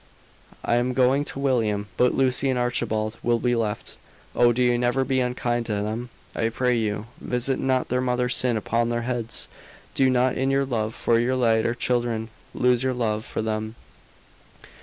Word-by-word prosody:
"I 120 - +2
am 125 +1 0
going 130 +2 +3
to - - -7
William. 115 -7 0
But 125 +5 +3
Lucy 135 0 +2
and 130 - +1
Archibald 115 -3 -1
will 120 0 +2
be 120 +1 0
left. 110 -3 -3 0.4
Oh, 120 0 +5
do 125 +2 +1
you 120 0 +3
never 125 +2 +1
be 130 0 +1
unkind 120 -1 -1
to 110 - -1
them! 110 +4 -3 0.3
I 115 - 0
pray 125 +2 +1
you, 105 -2 -1
visit 125 +2 -1
not 130 -1 0
their 125 +1 +1
mother's 125 -1 0
sin 125 -3 +2
upon 115 +2 0
their 120 0 -1
heads! 120 -2 -1 0.5
Do 135 -1 +3
not 125 0 +2
in 135 +1 0
your 135 0 +2
love 110 -4 -2
for 115 -1 +2
your 125 +2 +1
later 115 -1 +2
children, 120 -2 -1 0.3
lose 125 -1 +3
your 130 -1 0
love 110 -3 -1
for - - -3
them!" 110 0 -3
120 Hz, 180 wpm, -24 LUFS, 115-125 Hz, 0.5 s, Oh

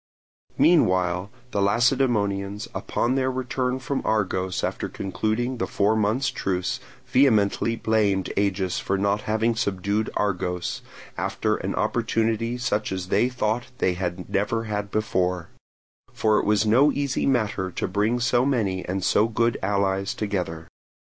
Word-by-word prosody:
Meanwhile 90 - +3 0.2
the 100 - 0
Lacedaemonians, 105 -2 +1
upon 120 - -1
their 130 -1 +1
return 130 0 -1
from 135 +1 -3
Argos 95 -4 0
after - - -2
concluding 110 +6 -2
the - - -1
four 105 +2 +2
months' 110 +5 +1
truce, 90 -7 -2 0.3
vehemently 115 -3 +3
blamed 105 -4 +1
Agis 95 -2 0
for 100 - -1
not 100 +2 +1
having 110 +2 +2
subdued 100 0 -1
Argos, 90 -4 -1 0.4
after - - 0
an - - -3
opportunity 115 +1 0
such 110 -4 -1
as 95 -1 -4
they 125 - +3
thought 120 -1 -1
they 90 - +1
had 90 0 -4
never 110 +3 0
had 105 -2 -3
before; 90 -5 -1 0.6
for 110 -1 +2
it - - -2
was 105 0 +3
no 130 +8 +5
easy 140 -2 -1
matter 110 -7 0
to - - -3
bring 105 +5 +1
so 120 +1 +2
many 110 -9 0
and 95 +1 -2
so 105 - +3
good 115 +1 +1
allies 100 0 0
together. 90 -6 -3
105 Hz, 140 wpm, -24 LUFS, 95-120 Hz, 0.6 s, no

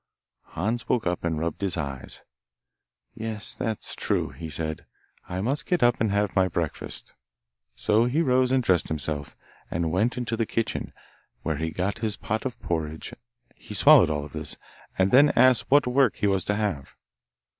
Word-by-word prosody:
Hans 110 +8 -2
woke 120 - +1
up 90 0 -1
and 80 -2 -1
rubbed 85 +3 -3
his 95 -3 0
eyes. 70 -4 -5 0.9
'Yes, 110 -1 -4
that's 110 -2 -3
true,' - - -1
he 80 -1 -8
said, 80 +1 -4 0.4
'I 90 +1 -3
must 135 +8 -1
get 175 -8 +1
up 120 -2 +3
and 110 - +2
have 100 -1 0
my 95 -1 +4
breakfast.' 85 -3 -4 0.6
So 110 +2 +2
he 145 +7 +1
rose 130 -2 +3
and 130 -1 +2
dressed 95 -6 +2
himself, 75 -1 -3 0.3
and 85 -1 -1
went 110 +8 +1
into 120 -2 -2
the 115 -1 -1
kitchen, 115 -1 -2 0.5
where 80 -2 -1
he 80 +1 -2
got 90 +5 -2
his 110 -2 -2
pot 110 +4 -3
of 125 - -9
porridge; 80 -2 -3 0.4
he 105 - -10
swallowed 140 - +7
all 75 -1 -2
of 75 - -13
this, - - -4 0.4
and 95 0 +2
then 140 +4 +7
asked 130 0 +4
what 145 +1 +5
work 125 -1 +3
he - - -2
was 95 -3 +2
to 105 - 0
have. 100 -10 -3
105 Hz, 175 wpm, -26 LUFS, 80-120 Hz, 0.9 s, swallowed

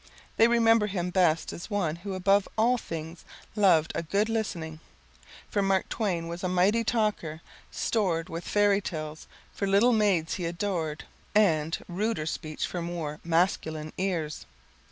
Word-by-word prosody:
They 225 - +7
remember 230 -2 +4
him 180 -3 -2
best 170 -3 +2
as 170 - -8
one 175 -7 -1
who 190 +2 -5
above 195 +2 +3
all 240 +3 +3
things 165 -1 -7 0.3
loved 180 -7 +4
a - - -1
good 200 +6 0
listening, 170 -8 -3 0.7
for 205 - 0
Mark 195 -1 +1
Twain 180 -7 -1
was 170 +2 -6
a 185 - 0
mighty 190 +6 +3
talker, 210 -9 -1 0.3
stored 180 -7 0
with 165 +1 -6
fairy 205 -1 +3
tales 155 -4 -6 0.3
for 200 - -2
the - - -1
little 235 +5 +5
maids 200 -7 +2
he 175 -3 -2
adored, 170 -3 -2 0.3
and 165 -7 +3
[text - - -4
unreadable], 175 - -8
ruder 220 -9 -2
speech 155 -1 -3
for 175 - -4
more 170 -3 -3
[text - - -28
unreadable] - - -9
masculine 160 -3 0
ears. 170 -6 -2
180 Hz, 170 wpm, -28 LUFS, 165-205 Hz, 0.7 s, They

